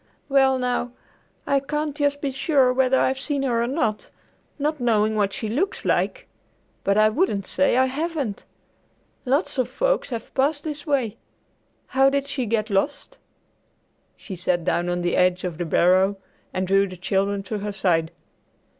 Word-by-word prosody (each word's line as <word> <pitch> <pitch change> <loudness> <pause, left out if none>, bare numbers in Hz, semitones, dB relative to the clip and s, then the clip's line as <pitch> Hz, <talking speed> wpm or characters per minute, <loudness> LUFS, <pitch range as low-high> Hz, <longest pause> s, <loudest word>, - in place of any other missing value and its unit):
"Well, 270 -1 +4
now, 245 -1 -1 0.5
I 280 - +2
can't 295 +1 -3
just 285 -1 0
be 280 - -1
sure 265 -2 +2
whether 260 0 +3
I've 265 0 +1
seen 280 0 -2
her 240 -3 +1
or 235 - 0
not, 240 -6 -1 0.5
not 300 +1 -1
knowing 220 -3 +2
what 205 -2 +1
she 225 0 -4
looks 310 - -2
like, - - 0 0.6
but 200 +1 +2
I 215 0 +6
wouldn't 215 - 0
say 280 -3 +2
I 260 - +5
haven't. 280 -5 -3 0.8
Lots 275 +2 0
of 255 - +1
folks - - 0
have 230 -3 -6
passed 285 +2 +1
this 300 -1 -6
way. 250 -7 0 0.7
How 270 0 +3
did 280 0 0
she 275 -4 -2
get 215 0 -1
lost?" 285 - -1 1.0
She 195 - -8
sat 175 -1 0
down 175 +1 0
on 175 0 -1
the 175 - 0
edge 180 0 +2
of 175 -3 -4
the 175 - -1
barrow 185 +4 +3 0.3
and 185 - -1
drew 195 +1 +3
the 185 -1 -9
children 195 +2 -1
to 210 +2 -4
her 205 +1 -4
side. 175 -5 +1
245 Hz, 170 wpm, -23 LUFS, 200-280 Hz, 1.0 s, I